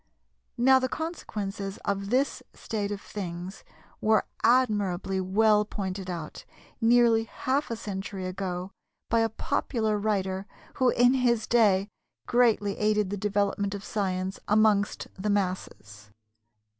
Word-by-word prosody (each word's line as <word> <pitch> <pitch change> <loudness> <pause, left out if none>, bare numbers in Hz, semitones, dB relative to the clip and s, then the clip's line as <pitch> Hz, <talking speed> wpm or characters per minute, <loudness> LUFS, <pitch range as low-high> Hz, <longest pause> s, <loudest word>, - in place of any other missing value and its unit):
Now 260 +2 +6
the 260 0 -1
consequences 205 - -4
of 200 0 -2
this 260 +4 +1
state 205 -2 -3
of 205 - -3
things 185 -2 -7 0.4
were 220 0 +3 0.2
admirably 205 -6 +2
well 210 +3 +3
pointed 190 -2 -5
out 170 -4 -6 0.4
nearly 230 -1 +4
half 265 +6 -2
a 230 - -2
century 195 -2 -5
ago 185 0 -4 0.4
by 230 - +3
a 225 0 +2
popular 220 -2 -1
writer, 195 -2 -1 0.3
who 255 -1 +4
in 245 +1 +4
his 240 -4 +2
day 205 -5 +3 0.4
greatly 225 -5 +2
aided 210 -2 +1
the - - -1
development 200 0 0
of 200 - -7
science 190 -3 -2
amongst 210 -1 +2
the 210 - -1
masses. 180 - -3
205 Hz, 125 wpm, -27 LUFS, 190-225 Hz, 0.4 s, Now